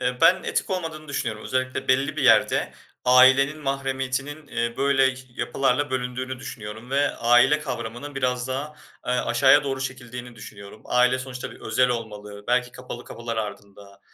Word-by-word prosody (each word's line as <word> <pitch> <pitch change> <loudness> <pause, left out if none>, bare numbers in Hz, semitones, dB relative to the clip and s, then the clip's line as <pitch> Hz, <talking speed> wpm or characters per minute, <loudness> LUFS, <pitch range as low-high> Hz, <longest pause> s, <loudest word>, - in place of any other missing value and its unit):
Eee, 125 0 -1
ben 180 +3 +5
etik - - -2
olmadığını 165 -4 -4
düşünüyorum. 110 -6 -3
Özellikle 130 0 -2
belli 140 +3 +2
bir 150 - -1
yerde 115 -5 +4 0.3
ailenin 130 +4 +6
mahremiyetinin, 135 +1 -3
eee, 120 -3 -2
böyle 135 -2 +3
ş 130 - -11
yapılarla 135 +3 0
bölündüğünü 130 0 -3
düşünüyorum 110 -1 -8
ve 140 +1 +2
aile 125 +5 +4
kavramının 140 -1 -6
biraz 125 -1 -1
daha, 140 +4 -4 0.3
eee, 125 - +1
aşağıya 135 +2 +4
doğru 135 -1 -2
çekildiğini 125 -2 -6
düşünüyorum. 100 0 -11
Aile 125 +1 +3
sonuçta 130 -1 -6
bir - - -14
özel 125 +3 +2
olmalı 105 -4 -5
belki 125 0 +1
kapalı 125 -1 -8
kapılar 115 0 -6
ardında, 100 -2 -7
130 Hz, 155 wpm, -24 LUFS, 120-135 Hz, 0.3 s, ailenin